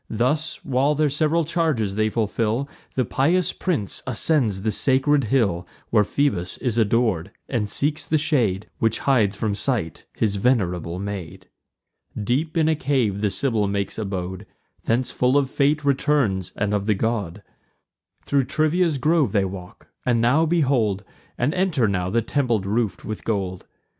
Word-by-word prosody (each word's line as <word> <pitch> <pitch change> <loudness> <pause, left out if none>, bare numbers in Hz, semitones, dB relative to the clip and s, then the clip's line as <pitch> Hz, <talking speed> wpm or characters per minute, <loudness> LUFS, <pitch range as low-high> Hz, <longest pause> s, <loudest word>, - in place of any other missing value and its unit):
Thus, 150 +7 -1
while 140 +2 +2
their 150 -1 +1
sev'ral 155 +3 +1
charges 150 - 0
they 110 +1 +1
fulfil, 115 +3 -1 0.3
The 130 - +1
pious 165 +10 +1
prince 155 - -2
ascends 115 -6 +1
the 110 - +1
sacred 135 +2 +2
hill 100 -8 +1 0.2
Where 105 -2 +5
Phoebus 100 -7 0
is 120 -3 -1
ador'd; 110 -5 +1 0.2
and 110 -5 -1
seeks 150 +6 0
the 155 - +2
shade 125 - +1
Which 110 -1 +1
hides 110 -7 +2
from 105 0 -1
sight 100 - -2
his 105 -2 0
venerable 90 -7 0
maid. 95 -4 -6 0.7
Deep 135 - -1
in 160 -1 +3
a 160 - +3
cave 130 -9 0
the 105 - +2
Sibyl 110 -3 0
makes 100 +2 -2
abode; 95 -1 -4 0.4
Thence 120 +2 +1
full 125 +2 +2
of 135 -2 +1
fate 145 +1 +1
returns, 135 - +1
and 100 0 -1
of 100 0 -1
the 105 - +3
god. 105 -3 -2 0.8
Thro' 140 -1 +2
Trivia's 155 +4 +1
grove 150 - +2
they 100 -2 +2
walk; 90 -2 -9 0.2
and 120 -2 +2
now 135 +8 +3
behold, 130 - +1 0.3
And 130 +6 0
enter 180 - +1
now, 90 -3 -1
the 115 +3 +1
temple 120 -2 +1
roof'd 100 0 -1
with 110 0 -6
gold. 95 -4 -3
115 Hz, 155 wpm, -23 LUFS, 100-145 Hz, 0.8 s, Where